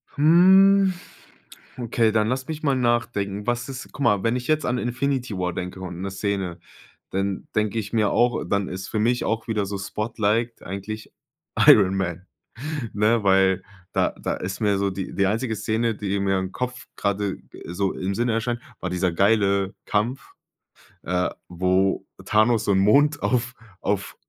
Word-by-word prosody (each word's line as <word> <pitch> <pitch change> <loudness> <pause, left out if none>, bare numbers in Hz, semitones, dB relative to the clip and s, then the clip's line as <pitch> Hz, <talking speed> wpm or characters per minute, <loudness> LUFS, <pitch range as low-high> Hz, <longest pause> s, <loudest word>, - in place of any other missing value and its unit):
Hm, 190 +5 +6 0.8
okay, 115 -2 +1
dann 110 0 +2
lass 130 +1 -2
mich 155 -1 -5
mal 140 -3 +2
nachdenken. 115 -5 0
Was 120 +1 -1
ist 130 -1 -7
guck - - -9
mal, 105 -6 +3
wenn 115 +1 +1
ich 125 0 -4
jetzt 155 0 +1
an 125 - 0
Infinity 125 -2 -2
War 90 -1 -1
denke 90 +2 -5
und 90 -1 -6
'ne 95 0 -3
Szene, 95 -3 -2 0.5
dann 95 0 -2
denke 105 +1 +1
ich 105 0 -6
mir 110 -3 +3
auch 120 0 +2
dann 100 -1 0
ist 95 +1 -6
für 110 - -1
mich 120 +3 +1
auch 110 0 -2
wieder 105 -3 0
so 100 0 -4
spotliked 110 +3 -1
eigentlich 100 +4 -6 0.6
Iron 95 -2 +7
Man, 90 -2 -3 0.7
ne? 105 +2 +2
Weil 95 -1 +3 0.3
da - - +2
da - - -1
ist 95 +4 -5
mir 100 -2 +2
so 100 0 +1
die 95 0 -5
die 100 - +2
einzige 110 +3 -1
Szene, 110 +1 0
die 100 -1 -2
mir 95 -1 +1
im 95 0 -4
Kopf 125 +1 -5
grade 100 -1 -1 0.3
so 95 +3 -1
im 95 +1 -3
Sinne 120 +2 0
erscheint, 120 +1 -1 0.2
war 90 - -3
dieser 90 0 0
geile 100 +1 +2
Kampf, 120 +6 -2 0.7
äh, 90 +1 0 0.2
wo 95 +2 +1 0.2
Thanos 110 +1 +3
so - - +2
'n 95 - +3
Mond 145 +9 +4
auf 125 0 0 0.3
auf 100 -1 -2
105 Hz, 170 wpm, -24 LUFS, 95-120 Hz, 0.8 s, Iron